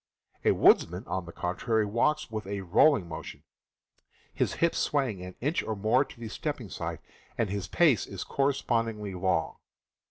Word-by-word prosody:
A - - +4
woodsman, 90 +3 +4
on 95 -2 -3
the - - -7
contrary, 105 +6 0
walks 120 +7 0
with 110 -2 -4
a 100 0 -3
rolling 95 - +4
motion, 85 - -8 0.9
his - - 0
hips 170 0 +1
swaying 130 -10 0
an 90 0 -8
inch 150 +7 +1
or 110 - -3
more 110 +6 +3
to 135 - -15
the 115 - -6
stepping 110 - -4
side, - - -4 0.4
and 110 -4 0
his 100 -2 -3
pace 150 - +3
is 95 -2 -5
correspondingly 115 -7 -1
long. 90 -4 0
110 Hz, 160 wpm, -29 LUFS, 95-130 Hz, 0.9 s, A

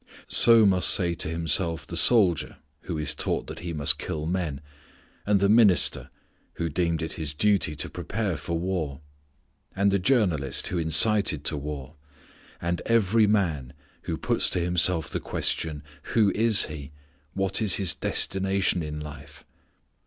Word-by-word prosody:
So 115 -2 +5
must 90 -4 +4
say 85 -3 +2
to 80 - -3
himself 80 +1 -2
the - - -8
soldier, 95 - +3 0.3
who 85 - -5
is 75 -1 +2
taught - - -2
that - - -9
he 85 0 -6
must 75 -3 +3
kill 75 -1 -5
men, 85 -5 -3 0.7
and 105 -1 +2
the 100 - +2
minister, 100 - +4 0.4
who 85 - -4
deemed 85 0 -2
it 80 - -6
his 75 -3 -4
duty 100 -4 +1
to 75 - -4
prepare 105 -5 -4
for 85 +3 -4
war, 80 -5 -4 0.7
and 100 +1 +1
the 100 - +1
journalist 90 - 0
who 90 - -3
incited 80 0 +3
to 80 - +1
war, 75 0 -8 0.6
and 85 0 -3
every 110 -1 +2
man, 80 -11 -1 0.3
who - - -4
puts - - 0
to - - 0
himself 85 -1 0
the - - -4
question, 75 -2 -3 0.3
Who 105 -4 +3
is 110 -1 +3
he, 75 -2 -9 0.5
what 95 +1 -1
is 105 -3 +4
his 95 -4 0
destination 95 -2 -1
in 75 -1 -6
life? 75 0 -11
85 Hz, 155 wpm, -25 LUFS, 75-100 Hz, 0.7 s, So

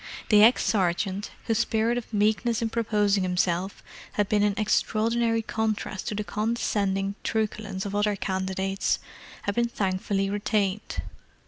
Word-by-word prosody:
The 210 -1 +7
ex 230 +4 +6
sergeant, 190 +1 0 0.2
whose 225 -1 +1
spirit 230 0 +1
of 245 -2 -5
meekness 220 +2 +1
in 225 - -1
proposing 210 -3 +2
himself 180 +1 -1 0.3
had 205 -1 +1
been 210 0 +2
in 205 -1 +2
extraordinary 225 +2 +1
contrast 215 -3 -2
to 210 - -2
the 210 - -2
condescending 205 -3 -1
truculence 210 -3 -2
of 200 - -4
other 205 0 +1
candidates, 190 0 -1 0.5
had 200 - -1
been 235 +2 +1
thankfully 195 -1 -1
retained. 205 0 -1
210 Hz, 135 wpm, -26 LUFS, 195-220 Hz, 0.5 s, The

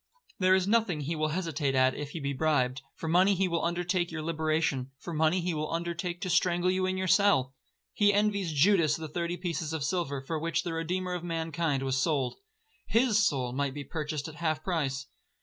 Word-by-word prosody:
There 185 0 +5
is 190 0 +1
nothing 205 -8 +2
he 155 +4 -2
will 155 0 0
hesitate 155 -4 -1
at 130 0 +4
if 145 -1 -5
he 165 - -6
be 140 -1 -2
bribed;—for 135 0 -1
money 185 +4 +4
he 190 +1 +1
will 170 -1 -1
undertake 175 +1 0
your 160 -1 -4
liberation—for 155 -3 -1
money 160 +3 +2
he 175 0 -1
will 155 0 -3
undertake 170 +1 -3
to 185 - -3
strangle 175 +1 +2
you 185 0 0
in 185 0 -1
your 185 0 -1
cell. 180 -10 +3 0.4
He 205 -1 +4
envies 200 -3 +1
Judas 155 0 +4
the 160 -1 -6
thirty 170 +3 -3
pieces 170 -2 -3
of 160 -3 -2
silver 150 -4 -1
for 155 +4 -4
which 165 0 -1
the 170 - -3
Redeemer 180 +3 -2
of 175 -1 -4
mankind 165 -4 -1
was 135 0 0
sold. 135 -5 0 0.5
His 225 -2 +3
soul 130 - 0
might 140 0 -1
be 145 - -5
purchased 150 0 -4
at 155 -1 -10
half 155 -1 -1
price. 140 -7 -1
165 Hz, 200 wpm, -29 LUFS, 145-180 Hz, 0.5 s, There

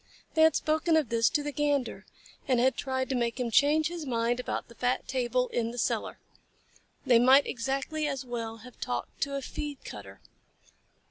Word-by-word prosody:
They 320 - +2
had 320 0 +6
spoken 315 +1 +2
of 300 -8 +1
this 230 -1 +3
to 295 - 0
the 295 - -3
Gander, 290 -3 -1 0.4
and 255 -3 +3
had 260 +2 +3
tried 260 -1 -2
to 265 - 0
make 235 0 -1
him 240 -2 -1
change 300 +6 +4
his 345 -2 -5
mind 240 -2 0
about 250 - -3
the 235 - -14
fat 250 +2 -1
table 250 -1 0
in 230 -1 -1
the 240 - -8
cellar. - - -1 0.9
They 240 -2 +6
might 260 +4 +6
exactly 275 +5 -2
as 275 -2 -3
well 230 -2 -4
have 250 - -14
talked 120 0 -4
to 280 0 -1
a 275 - -3
feed 290 0 -6
cutter. - - -9
260 Hz, 190 wpm, -29 LUFS, 240-290 Hz, 0.9 s, had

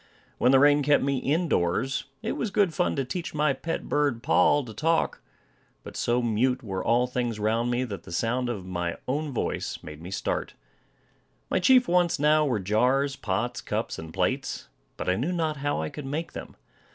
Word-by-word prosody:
When 125 - +4
the 135 - +7
rain 145 +2 +5
kept 145 0 +3
me 140 0 +1
in 160 +7 0
doors, 115 - 0 0.2
it - - -1
was 225 - -2
good 195 -4 +2
fun 180 - 0
to 135 -2 -1
teach 165 +5 -5
my 150 -2 +2
pet 165 +4 -4
bird 145 -6 0
Poll 145 -2 +4
to 110 - -9
talk; 165 +9 0 0.6
but - - -10
so 120 +1 +1
mute 125 +3 +1
were 95 -4 -3
all 120 +2 +3
things 120 -3 -2
round 115 +3 +1
me, 120 +1 0
that 105 -6 -5
the - - -12
sound 120 +7 0
of 100 -6 -4
my 90 -2 -3
own 145 +3 -1
voice 125 - -2
made 75 0 -9
me 85 - -8
start. 95 - -3 1.0
My - - +3
chief 250 +6 +5
wants 175 -1 +3
now 150 +1 +4
were 120 -6 0
jars, 125 +8 +2
pots, 110 +1 -2
cups, - - -3
and 80 0 -8
plates, - - -2 0.3
but - - -5
I 90 - +3
knew 135 - -1
not 160 -4 -1
how 145 - -1
I 80 - -3
could 150 -3 -7
make 155 +4 -3
them. - - -8
130 Hz, 200 wpm, -27 LUFS, 110-150 Hz, 1.0 s, the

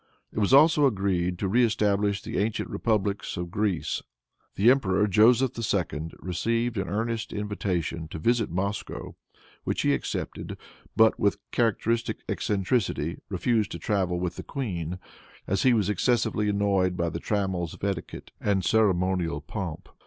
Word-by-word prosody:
It - - -2
was 100 +1 +2
also 145 +1 +6
agreed 95 -5 0
to 95 - -1
reëstablish 105 -2 +2
the - - -3
ancient 105 +2 -1
republics 100 -5 -1
of 85 -1 -4
Greece. 100 -4 -1 0.5
The 110 +5 +6
emperor, 105 -7 +2
Joseph 115 +5 +4
II., 90 -8 -1
received 115 +6 -1
an 95 -3 -3
earnest 110 +2 -2
invitation 90 -6 -2
to 80 - -7
visit 115 +6 +1
Moscow, 100 +4 -4 0.5
which - - -1
he - - +3
accepted, - - -4 0.4
but, 110 0 +5
with 100 0 +2
characteristic 115 0 0
eccentricity, 95 - -1
refused 105 +2 +1
to - - -4
travel 95 -4 0
with 90 -1 -3
the - - -5
queen, 90 - -4 0.5
as 95 0 0
he 130 - +5
was 110 -5 +2
excessively 105 0 +1
annoyed 100 -3 +1
by 85 -1 0
the 85 - -4
trammels 95 -4 -1
of - - -19
etiquette 100 -5 -4
and 95 -3 +1
ceremonial 90 -7 +2
pomp. 85 +2 -6
100 Hz, 145 wpm, -27 LUFS, 90-110 Hz, 0.5 s, also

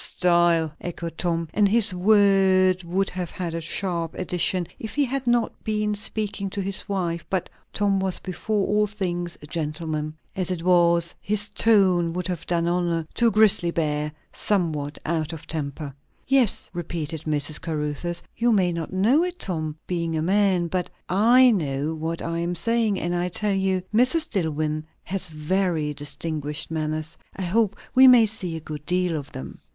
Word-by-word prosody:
"Style!" 170 -3 +2
echoed 170 -1 -5
Tom, 170 -2 -1
and 205 -1 +3
his 220 -2 +4
word 190 -1 +4
would 185 +3 0
have 180 -2 -4
had 175 -3 -5
a 165 - -3
sharp 170 0 -2
addition 180 0 0
if 220 - -7
he 290 -1 +3
had 265 0 -3
not 240 -1 0
been 210 -1 0
speaking 210 -1 -2
to 200 - -5
his 195 0 -4
wife; 175 -4 -2
but 190 -2 -2 0.2
Tom 200 -2 +1
was 190 -1 -1
before 195 +2 -2
all 210 +1 +2
things 175 -4 -3
a - - -7
gentleman. 155 0 -3 0.2
As 185 -2 -1
it 175 -3 -2
was, 170 -1 +3
his 205 0 -1
tone 190 -6 +3
would 180 0 -2
have 175 -3 -4
done 170 -1 +1
honour 170 -2 0
to 235 - +3
a - - +6
grisly 210 -5 +5
bear 150 -2 -1 0.2
somewhat 155 -7 -1
out 160 -1 -1
of 160 - -9
temper. 145 -2 -4 0.3
"Yes," 260 -5 +2
repeated 165 -2 -4
Mrs. 150 -1 0
Caruthers. 160 +2 -3
"You 235 +1 +2
may 185 -5 +3
not 165 -1 -4
know 225 - +3
it, 360 0 -3
Tom, 155 - -3
being 170 -2 -2
a 155 - -1
man; 190 -1 +2
but 180 +1 -2 0.2
I 240 +7 +6
know 150 -5 -1
what 160 +1 -4
I 165 0 -2
am 175 +1 -2
saying; 225 +1 +1
and 175 +1 -2
I 175 +1 0
tell 205 +3 -1
you 190 -1 0
Mrs. 255 +8 +3
Dillwyn 155 -5 -1 0.2
has 190 0 -3
very 160 -1 -1
distinguished 150 +1 -3
manners. 155 0 -3 0.2
I 190 - -4
hope 200 +2 +1 0.2
we 260 0 +8
may 245 -3 +8
see 195 -6 -2
a - - -4
good 150 -1 -8
deal 180 -1 +2
of 145 -3 -6
them." 65 0 -8
175 Hz, 175 wpm, -24 LUFS, 160-200 Hz, 0.3 s, we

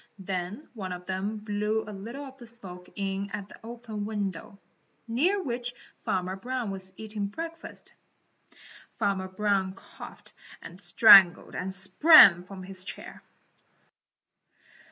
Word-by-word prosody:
Then 190 - -5
one 190 -6 -5
of 180 0 -9
them 195 +3 -3
blew 210 +1 -2
a 210 - -7
little 235 +9 -8
of 265 0 -13
the 240 - -11
smoke 185 -6 -8
in 195 0 -3
at 205 0 -7
an - - -12
open 230 -2 -7
window, 200 -3 -5 0.5
near 320 - +1
which 245 -2 -4 0.3
Farmer 185 0 -1
Brown 240 +1 -4
was 190 -1 -4
eating 215 -2 -4
breakfast. 330 +9 -8 1.0
Farmer 195 -3 -1
Brown 190 0 0
coughed - - -13 0.3
and 180 +3 -12
strangled 190 0 +7
and 185 +1 -4
sprang 190 - +7
from 190 0 -10
his 185 0 -6
chair. - - -9
200 Hz, 130 wpm, -27 LUFS, 190-230 Hz, 1.0 s, strangled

